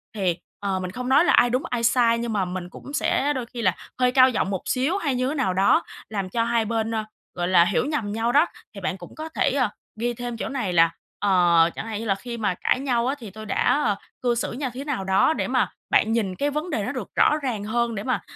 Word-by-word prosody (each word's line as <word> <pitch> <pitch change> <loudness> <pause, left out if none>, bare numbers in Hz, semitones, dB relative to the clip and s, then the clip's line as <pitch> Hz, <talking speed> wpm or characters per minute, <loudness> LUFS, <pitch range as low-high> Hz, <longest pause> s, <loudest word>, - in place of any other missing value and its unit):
thì, 185 -4 0 0.2
ờ, 195 -2 -1
mình 185 0 -4
không 250 +4 -5
nói 285 +6 +5
là - - +4
ai 245 - +5
đúng 255 +3 0
ai 240 -1 -2
sai 230 -1 +4
nhưng 235 -1 -3
mà 200 -3 +1
mình 180 0 -5
cũng 280 +9 -11
sẽ 290 0 +1
đôi 255 -4 -3
khi 235 0 -7
là 185 -4 +2 0.2
hơi 250 0 +3
cao 255 0 +6
giọng 200 -5 -1
một 190 -2 -2
xíu 275 +9 0
hay 285 -9 -1
như 255 +1 0
thế 305 - -2
nào 245 -10 0
đó, 190 +2 +4 0.3
làm 195 -3 -3
cho 230 +3 0
hai 235 -1 +1
bên, 225 0 -1
ơ, 220 - -1 0.3
gọi 175 -1 -1
là, 175 -2 +5
hiểu 200 - +1
nhầm 270 -9 -2
nhau 230 +2 0
đó. 290 +5 +5 0.3
Thì 195 - -8
bạn 190 0 -2
cũng 175 - -12
có 315 +1 -6
thể, - - +1
ờ, 255 -4 +1 0.3
ghi 240 +1 0
thêm 240 0 -5
chỗ - - -4
này 235 -10 -2
là, 165 0 +5 0.3
ờ, 175 -4 +4
chẳng - - -5
hạn 215 -2 -4
như 230 - -5
là 195 - +1
khi 235 +4 -7
mà 205 -4 0
cãi - - +2
nhau 245 -3 0
á, 270 - 0
thì 225 -5 -8
tôi 215 +2 -9
đã, 285 +7 +2
ờ, 205 - +2 0.3
cư 240 -1 +1
xử - - -2
nha 260 +2 -3
thế 265 - -5
nào 285 -9 -2
đó 190 +11 +3
để - - -2
mà - - +1 0.2
bạn 220 - +3
nhìn 205 -5 0
cái 285 +6 0
vấn 300 +5 -3
đề - - -1
nó - - -2
được - - -5
rõ 300 - +4
ràng 225 -6 -2
hơn 235 +2 -1
để 200 - -4
mà, 255 -2 -1
230 Hz, 275 wpm, -24 LUFS, 195-255 Hz, 0.3 s, cao